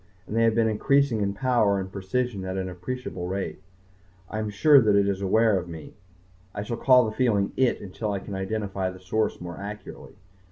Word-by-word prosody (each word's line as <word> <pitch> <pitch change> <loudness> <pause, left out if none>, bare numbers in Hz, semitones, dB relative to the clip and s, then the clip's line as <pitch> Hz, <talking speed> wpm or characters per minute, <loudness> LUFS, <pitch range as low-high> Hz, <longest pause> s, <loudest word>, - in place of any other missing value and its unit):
And 105 - -6
they 115 0 +4
have 115 -1 +3
been 115 -1 +3
increasing 130 +2 +2
in 100 0 -1
power 110 -4 +2
and 95 0 -5
precision 100 +2 -2
at 95 0 -4
an 95 -1 -2
appreciable 90 +1 -5
rate. 95 +1 -4 0.7
I 110 - -3
am 110 -1 -2
sure 140 +8 +6
that 105 -3 +3
it 100 0 +3
is 100 -1 -1
aware 105 +1 +3
of 90 -1 -8
me. 80 -2 -9 0.6
I 100 - -3
shall 115 +2 -4
call 125 -1 +5
the 110 - -2
feeling 105 -6 +1
"it" 130 -2 +2
until 105 +2 -4
I 100 - -1
can 100 +1 -8
identify 95 -1 -2
the 95 0 -10
source 100 +4 -1
more 85 -1 -7
accurately. 105 +1 -9
100 Hz, 205 wpm, -26 LUFS, 95-115 Hz, 0.7 s, sure